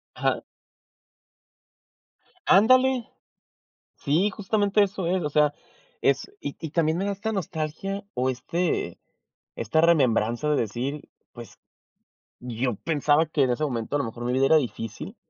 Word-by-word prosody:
Ajá. - - 0 2.1
Ándale. 255 +4 +5 0.9
Sí, 165 +8 +1
justamente 205 +1 +1
eso 195 -2 -4
es, 185 +2 +1
o 150 - -1
sea, 150 0 +3 0.5
es - - +1
y - - -5
y 160 - -5
también 160 0 +1
me 190 - -1
da 200 - -1
esta 210 +3 -3
nostalgia 190 +2 -4
o 130 +1 +1
este 130 - -2 0.6
esta 115 +8 +1
remembranza 130 -5 +2
de 150 - +3
decir, 125 +7 -3 0.2
pues 120 -1 -12 0.8
yo 125 0 -2
pensaba 150 +3 +2
que 155 -2 +1
en 130 - +1
ese 125 +5 -1
momento 125 -3 -2
a - - +2
lo 140 - -1
mejor 115 +1 -7
mi 125 - 0
vida 135 +1 +3
era 160 - +6
difícil 115 -6 -4
150 Hz, 140 wpm, -25 LUFS, 125-190 Hz, 2.1 s, era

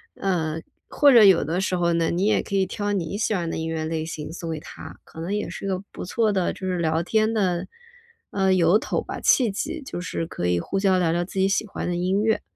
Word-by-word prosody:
嗯， 165 -4 -1 0.3
或 285 -2 +5
者 235 -3 +8
有 190 -4 +7
的 170 +5 -1
时 185 -1 0
候 170 -1 +1
呢， 165 -1 +1
你 180 +3 0
也 215 - +2
可 200 - -4
以 190 - +3
挑 205 +2 -3
你 190 -1 -2
喜 220 0 0
欢 175 -4 -1
的 - - -3
音 160 0 -3
乐 160 -1 -2
类 160 0 -2
型 155 -2 -6
送 165 -1 -5
给 160 - -4
他， - - -11
可 160 - -10
能 175 +5 -3
也 210 - -2
是 - - -8
一 - - -2
个 185 0 -1
不 - - -6
错 215 +3 +1
的， 190 -3 +1
就 190 - -6
是 180 -1 -1
聊 160 -1 +1
天 220 +4 +1
的 185 -5 0 0.6
呃， 190 -1 +2
由 180 +1 +4
头 - - -2
吧， - - -7
契 245 -4 +4
机， 295 +10 -4
就 265 -9 -6
是 165 -2 -3
可 125 - -5
以 90 0 +2
互 195 - -3
相 195 -1 +3
聊 165 -2 +1
聊 175 +1 0
自 190 +2 -5
己 190 - +4
喜 200 +2 0
欢 205 - -5
的 175 - -1
音 185 +3 +1
乐。 220 0 +1
185 Hz, 280 characters per minute, -24 LUFS, 165-205 Hz, 0.6 s, 者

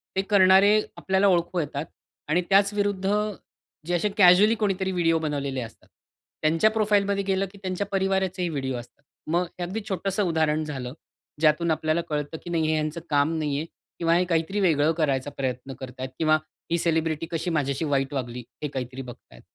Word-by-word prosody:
ते 190 - +2
करणारे 200 +1 +6 0.2
आपल्याला 190 +1 +2
ओळखू 175 -1 +1
येतात 150 -1 -3 0.4
आणि 170 +4 +3
त्याच 200 +1 +4
विरुद्ध 200 -2 0 0.8
जे 175 - -2
असे 190 +5 +1
कॅज्युअली 200 +3 +6
कोणीतरी 190 -2 0
व्हिडिओ 165 -3 +2
बनवलेले 140 -4 -2
असतात. 115 -2 -10 0.5
त्यांच्या 165 +7 +3
प्रोफाइल 210 -2 +2
मध्ये 200 0 0
गेलं 195 0 0
की 200 - -15
त्यांच्या 185 +1 -2
परिवाराचे 190 -2 0
व्हिडिओ 135 -4 -3
असतात. 120 +4 -12 0.3
मग 175 +2 +2
हे 180 - -3
अगदी 190 +6 -3
छोटसं 195 +1 -1
उदाहरण 155 -3 +1
झालं. 130 -5 -5 0.5
ज्यातून 155 +2 +3
आपल्याला 155 +1 0
कळतं 150 +1 -3
की - - -8
नाही 165 -2 +1
हे 160 - +2
ह्यांचं 155 +1 -2
काम 145 +1 +2
नाही 145 -2 -1
आहे 155 - -2 0.3
किंवा 165 -1 +2
हे 180 - +3
काहीतरी 170 +3 0
वेगळं 160 -5 +3
करायचा 140 -4 0
प्रयत्न 130 0 -3
करत 130 -1 -7
आहेत 130 0 -4
किंवा 155 -1 +4 0.3
ही 170 - +3
सेलिब्रिटी 160 -1 0
कशी 165 +2 -2
माझ्याशी 145 -2 -1
वाईट 140 -1 0
वागली 125 -3 -4 0.2
हे - - 0
काहीतरी 130 -1 -5
बघत 125 -2 -11
आहेत. - - -15
165 Hz, 180 wpm, -25 LUFS, 145-190 Hz, 0.8 s, करणारे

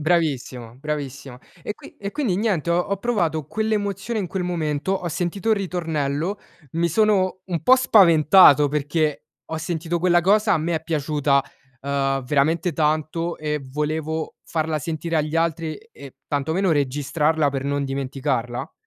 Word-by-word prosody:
Bravissimo 135 -8 -1
bravissima. 140 -3 -5 0.2
E 210 - -4
qui - - -15
e 200 0 -5
quindi 250 -12 0
niente, 190 -6 0
ho 170 - +3
ho 200 +3 -1
provato 170 - -1
quell'emozione 215 0 -2
in 190 - -3
quel 190 -2 -3
momento, 160 0 -1
ho 180 -2 -2
sentito 180 +6 -2
il 220 - +4
ritornello, 165 -1 -2 0.3
mi 170 +1 +1
sono 190 0 +2
un 170 -4 -3
po' 255 - +7
spaventato 170 - +6
perché 150 +1 -1 0.2
ho 160 - -4
sentito 165 +1 -2
quella 175 0 +3
cosa, 210 +4 +3
a 175 - +3
me 165 +2 -1
è 160 - -2
piaciuta, 145 -3 +1 0.4
uhm, 135 -1 -1
veramente 155 +6 +1
tanto 155 +2 -1
e 150 -1 -2
volevo 155 +2 -2
farla 160 -1 -1
sentire 165 +2 -3
agli 155 0 -1
altri 165 -1 0
e - - -19
e 140 -2 -12
tanto 145 +2 -1
meno 190 +2 +1
registrarla 150 +2 +1
per 135 -1 -3
non 140 0 -1
dimenticarla. 135 -3 -3
160 Hz, 155 wpm, -22 LUFS, 145-180 Hz, 0.4 s, po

